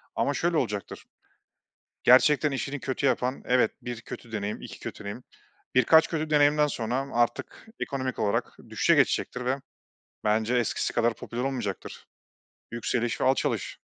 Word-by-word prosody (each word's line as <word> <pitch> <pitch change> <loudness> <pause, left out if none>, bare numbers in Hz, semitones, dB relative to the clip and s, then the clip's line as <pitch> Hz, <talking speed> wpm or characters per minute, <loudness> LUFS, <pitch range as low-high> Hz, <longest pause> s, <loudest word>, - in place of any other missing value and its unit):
ama 140 - +1
şöyle 170 +2 0
olacaktır, 105 -7 -3 1.0
gerçekten 145 +4 +5
işini 135 +1 -3
kötü 135 +2 -1
yapan 130 0 0
evet, 125 0 +3
1 120 -2 -5
kötü 115 0 -10
deneyim, 105 -1 -3
2 - - -9
kötü - - -7
deneyim, 100 +5 -6 0.5
birkaç 160 +6 +6
kötü 155 -2 -2
deneyimden 150 0 +4
sonra 130 0 -2
artık 120 - -1
ekonomik 130 -2 -3
olarak 100 - -1
düşüşe - - +3
geçecektir 125 0 +1
ve 130 +2 +1 0.7
bence 110 +3 +1
eskisi 120 -2 0
kadar 120 -1 +2
popüler 120 +2 -5
olmayacaktır. 125 -8 -4 0.7
Yükseliş 120 0 -1
ve - - +2
alçalış. 130 +1 0
125 Hz, 140 wpm, -27 LUFS, 115-140 Hz, 1.0 s, birkaç